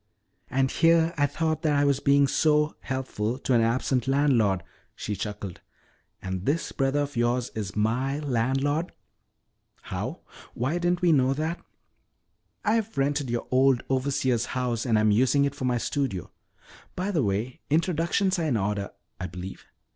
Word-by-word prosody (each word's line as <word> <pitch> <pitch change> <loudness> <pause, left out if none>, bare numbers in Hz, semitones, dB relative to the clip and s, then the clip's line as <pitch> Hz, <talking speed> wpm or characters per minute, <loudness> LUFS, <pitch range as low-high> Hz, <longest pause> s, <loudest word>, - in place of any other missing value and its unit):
"And 130 +1 +1
here 165 0 +4
I 145 -2 +2
thought 155 +1 -1
that 155 -3 +2
I 145 - +3
was 140 -2 +2
being 140 0 +4
oh - - +6
so 150 +2 +2
helpful 130 -4 -3
to 135 - -1
an 120 - +5
absent 125 +2 +1
landlord," 125 -10 +2 0.3
she 105 - -4
chuckled. 100 -2 -6 0.6
"And 95 0 -4
this 155 +4 0
brother 135 +2 +1
of 145 -1 -4
yours 120 +1 0
is 105 -4 -5
my 120 +6 0
landlord!" 140 +4 0 0.9
"How? - - -5 0.3
Why, 130 +6 -1
we 175 - 0
didn't 175 0 0
know 135 -6 +4
that." 160 +4 -3 1.0
"I've 220 0 0
rented 140 -1 0
your 120 0 -2
old 130 -1 +4
overseer's 130 -3 +1
house 125 -1 -1
and 115 -2 +3
am 110 0 +3
using 130 +6 +3
it 140 - -1
for 135 - -4
my 125 -1 +1
studio. 120 - -2 0.6
By 190 +3 -2
the 165 -6 +1
way, 110 +3 -2
introductions 170 +4 +1
are 165 - 0
in 135 -7 +1
order, 100 -1 -1 0.3
I 90 - -3
believe. 90 +2 -8
135 Hz, 160 wpm, -26 LUFS, 115-150 Hz, 1.0 s, oh